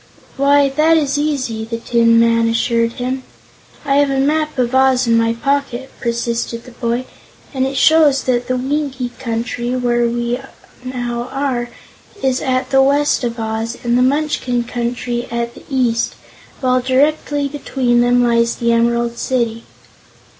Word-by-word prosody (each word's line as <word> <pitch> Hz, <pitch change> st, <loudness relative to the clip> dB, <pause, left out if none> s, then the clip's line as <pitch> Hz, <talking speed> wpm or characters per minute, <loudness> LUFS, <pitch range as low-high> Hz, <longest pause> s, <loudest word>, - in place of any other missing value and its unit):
"Why, 280 Hz, +1 st, +4 dB
that 310 Hz, +4 st, +3 dB
is 290 Hz, -2 st, 0 dB
easy," 260 Hz, -7 st, -2 dB
the 230 Hz, +1 st, -4 dB
Tin 230 Hz, 0 st, +3 dB
Man 230 Hz, 0 st, +3 dB
assured 230 Hz, 0 st, +1 dB
him. 255 Hz, +2 st, -3 dB, 0.6 s
"I 275 Hz, -1 st, +2 dB
have 285 Hz, -1 st, +3 dB
a 270 Hz, -1 st, 0 dB
map 305 Hz, +2 st, 0 dB
of 250 Hz, -1 st, 0 dB
Oz 260 Hz, -1 st, +3 dB
in 230 Hz, -1 st, +3 dB
my 230 Hz, 0 st, +2 dB
pocket," 270 Hz, 0 st, -2 dB
persisted 235 Hz, -1 st, -2 dB
the 250 Hz, -, -13 dB
boy, 240 Hz, +1 st, -2 dB, 0.5 s
"and 265 Hz, -1 st, 0 dB
it 270 Hz, 0 st, -4 dB
shows 300 Hz, -2 st, +4 dB
that 245 Hz, -1 st, 0 dB
the 255 Hz, -, 0 dB
Winkie 265 Hz, -1 st, -2 dB
Country, 240 Hz, +1 st, -3 dB
where 240 Hz, -1 st, +1 dB
we 240 Hz, +1 st, -2 dB, 0.4 s
now 245 Hz, -1 st, -4 dB
are, 260 Hz, -3 st, -2 dB, 0.5 s
is 260 Hz, -1 st, +1 dB
at 255 Hz, -1 st, -1 dB
the 270 Hz, 0 st, +5 dB
west 280 Hz, +1 st, +2 dB
of 235 Hz, -1 st, -3 dB
Oz, 225 Hz, +1 st, -3 dB
and 240 Hz, 0 st, +1 dB
the 250 Hz, -, +3 dB
Munchkin 260 Hz, -3 st, 0 dB
Country 240 Hz, 0 st, -3 dB
at 235 Hz, 0 st, -3 dB
the -, -, -15 dB
east, 245 Hz, -4 st, 0 dB, 0.5 s
while 255 Hz, -1 st, +2 dB
directly 285 Hz, +2 st, +1 dB
between 265 Hz, -4 st, 0 dB
them 245 Hz, 0 st, +3 dB
lies 235 Hz, -1 st, +2 dB
the 235 Hz, -1 st, 0 dB
Emerald 235 Hz, 0 st, +1 dB
City." 230 Hz, -3 st, -1 dB
245 Hz, 155 wpm, -17 LUFS, 235-270 Hz, 0.6 s, the